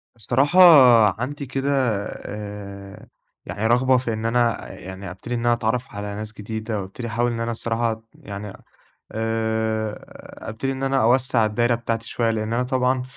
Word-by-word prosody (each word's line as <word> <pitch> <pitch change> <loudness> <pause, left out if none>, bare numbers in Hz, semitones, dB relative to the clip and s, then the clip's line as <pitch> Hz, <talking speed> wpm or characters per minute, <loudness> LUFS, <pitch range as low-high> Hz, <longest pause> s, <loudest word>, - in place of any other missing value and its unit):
الصراحة 135 - +2 0.6
عندي 140 +3 -4
كده 135 +2 -2 0.4
آآ، 100 -1 -8 0.4
يعني 100 +5 -2
رغبة 130 +2 +4
في 120 -2 -2
إن 110 +1 -4
أنا 120 0 0
يعني 95 +1 -8
ابتدي 120 +6 -6
إن - - -1
أنا 120 0 +2
أتعرف 120 0 -2
على 105 0 -5
ناس 105 +1 -6
جديدة، 110 0 -4
وابتدي 100 +6 -7
احاول 120 +2 0
إن 115 - -4
أنا 115 0 -2
الصراحة 115 -1 -2
يعني 100 -1 -8 0.6
آآ، 110 -1 -1 0.5
ابتدي 135 +5 -3
إن 135 0 -5
أنا 135 0 +2
أوسّع 125 -1 +3
الدايرة 120 +3 +1
بتاعتي 115 -1 -3
شوية، 115 -1 0
لإن 110 0 -2
أنا 120 +2 +1
طبعًا 130 0 0
115 Hz, 155 wpm, -23 LUFS, 110-125 Hz, 0.6 s, رغبة